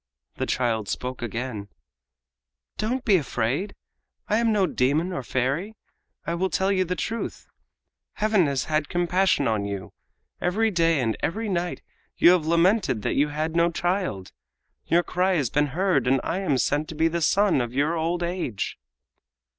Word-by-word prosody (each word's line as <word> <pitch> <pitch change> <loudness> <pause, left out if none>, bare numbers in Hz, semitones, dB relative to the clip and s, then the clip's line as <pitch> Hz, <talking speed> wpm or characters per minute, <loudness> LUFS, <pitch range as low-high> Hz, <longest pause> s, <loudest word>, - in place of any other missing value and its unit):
The - - -2
child 115 -5 0
spoke 125 +3 -4
again: 115 -3 -4 1.1
"Don't 245 +4 -1
be 200 -4 +5
afraid. 140 - -2 0.5
I 215 - +2
am 230 -1 +2
no 205 -3 +3
demon 155 +4 0
or 175 - -3
fairy. 135 - -2 0.5
I 165 - -1
will 185 +2 0
tell 190 +1 +1
you 190 -1 +2
the 180 0 -2
truth. 230 +5 -4 0.7
Heaven 210 -6 +2
has 140 -3 0
had 155 -1 -1
compassion 175 -3 +2
on 110 -3 0
you. 100 -3 -5 0.5
Every 215 +5 +1
day 165 -4 +2
and 115 -3 0
every 220 +5 -2
night 175 -2 -2 0.3
you 175 - +7
have 175 -4 +2
lamented 170 - +2
that - - 0
you 145 +2 +2
had 155 +2 -3
no 170 0 +4
child. 175 - -2 0.6
Your 175 +1 +3
cry 185 +2 +1
has 135 -7 0
been 150 0 +2
heard 155 -3 +1
and 135 +1 +3
I 175 - -2
am 155 -9 +1
sent 145 +4 0
to 160 - -8
be 160 +2 +3
the 170 +1 -2
son 190 -2 +3
of 120 -1 -3
your 145 +4 +1
old 170 +2 -1
age!" 170 - -3
165 Hz, 170 wpm, -25 LUFS, 130-185 Hz, 1.1 s, you